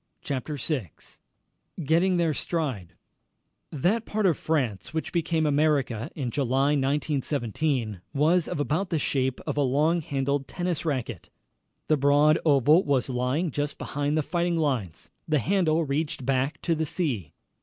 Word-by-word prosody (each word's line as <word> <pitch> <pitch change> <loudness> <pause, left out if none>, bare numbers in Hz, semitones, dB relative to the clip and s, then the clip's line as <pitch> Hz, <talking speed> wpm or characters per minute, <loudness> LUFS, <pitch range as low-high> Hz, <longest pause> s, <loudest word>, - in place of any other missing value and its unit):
CHAPTER 145 +2 -3
VI 130 - -2 0.9
GETTING 175 +5 +2
THEIR 165 -3 +2
STRIDE 135 - -3 0.8
That 180 - +1
part 215 -2 -1
of 175 -5 +4
France 135 -5 -2
which 160 - -2
became 165 -2 +1
America 145 -5 +1
in 130 -6 -3
July, 135 +2 +1
1917, 140 - -1
was 155 +4 +2
of - - -4
about 160 +6 0
the 165 - 0
shape 130 -3 0
of - - -3
a - - +3
long 150 +6 +2
handled 140 -1 -1
tennis 175 -3 -3
racket. 135 -6 -3 0.6
The 155 - +3
broad 145 +3 +4
oval 150 +3 +5
was 135 -3 +1
lying 130 +7 0
just 145 +2 -3
behind 145 +2 -2
the 155 - +1
fighting 170 +2 0
lines. 130 - -2 0.2
The 155 - +2
handle 165 0 +1
reached 145 -2 -2
back 135 +2 0
to 170 - +1
the 160 -1 -1
sea. 125 - -2
145 Hz, 145 wpm, -26 LUFS, 135-160 Hz, 0.9 s, oval